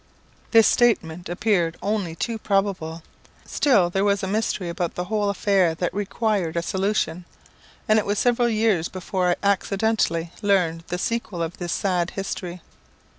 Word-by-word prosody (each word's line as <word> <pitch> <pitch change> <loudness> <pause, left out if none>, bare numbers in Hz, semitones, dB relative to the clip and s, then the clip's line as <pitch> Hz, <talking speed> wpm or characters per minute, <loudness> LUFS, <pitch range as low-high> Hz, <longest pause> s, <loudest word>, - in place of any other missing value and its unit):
This 225 -1 +6
statement 180 -9 +2
appeared 175 -3 +1
only 200 -6 -2
too 225 +6 -3
probable. 195 -6 -1 0.4
Still 200 -12 +2
there 195 +2 +1
was 200 0 +1
a - - -1
mystery 205 -2 -1
about 170 0 -3
the 180 - -2
whole 205 +1 0
affair 195 -4 +2
that 175 +2 -2
required 200 -4 -1
a 170 - 0
solution, 190 -3 -1 0.6
and 215 0 +5
it 210 - -2
was 205 +1 0
several 240 +1 +2
years 215 -7 +1
before 185 0 -1
I 175 - +3
accidentally 195 -4 +1
learned 175 -5 +1
the 180 - -3
sequel 195 -4 -2
of 165 +2 -5
this 175 -2 -3
sad 180 -2 0
history. 180 -3 -5
190 Hz, 155 wpm, -23 LUFS, 175-210 Hz, 0.6 s, This